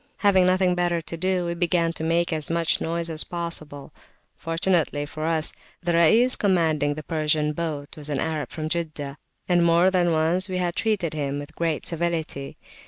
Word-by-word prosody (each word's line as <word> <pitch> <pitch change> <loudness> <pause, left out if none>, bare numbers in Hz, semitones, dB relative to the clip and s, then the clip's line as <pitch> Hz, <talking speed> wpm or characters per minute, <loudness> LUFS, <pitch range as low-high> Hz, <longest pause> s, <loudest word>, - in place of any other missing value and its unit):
Having 190 -3 +4
nothing 185 0 +3
better 175 -1 0
to 165 +1 -6
do, 185 +1 0
we 170 - -1
began 170 -1 +1
to 160 - -6
make 170 +1 +1
as 155 -1 -2
much 165 -1 +1
noise 170 +1 -2
as 160 -1 +1
possible. 160 -5 -5 0.4
Fortunately 165 -3 0
for 155 +2 -5
us, 160 -1 0 0.3
the 175 - 0
Rais 220 +10 +5
commanding 160 -7 +1
the 155 - -7
Persian's 150 -1 0
boat 150 -3 -4
was 150 -1 -6
an 145 - -1
Arab 155 0 -2
from 155 -1 -4
Jeddah; 155 -4 -3 0.3
and 175 -1 +3
more 170 +2 +4
than 175 -2 +2
once 165 +4 +2
we 185 - -2
had 175 -1 -1
treated 200 -8 0
him 145 -2 -2
with 145 +2 -8
great 165 -3 -1
civility. 165 -4 -3
165 Hz, 180 wpm, -24 LUFS, 155-175 Hz, 0.4 s, Rais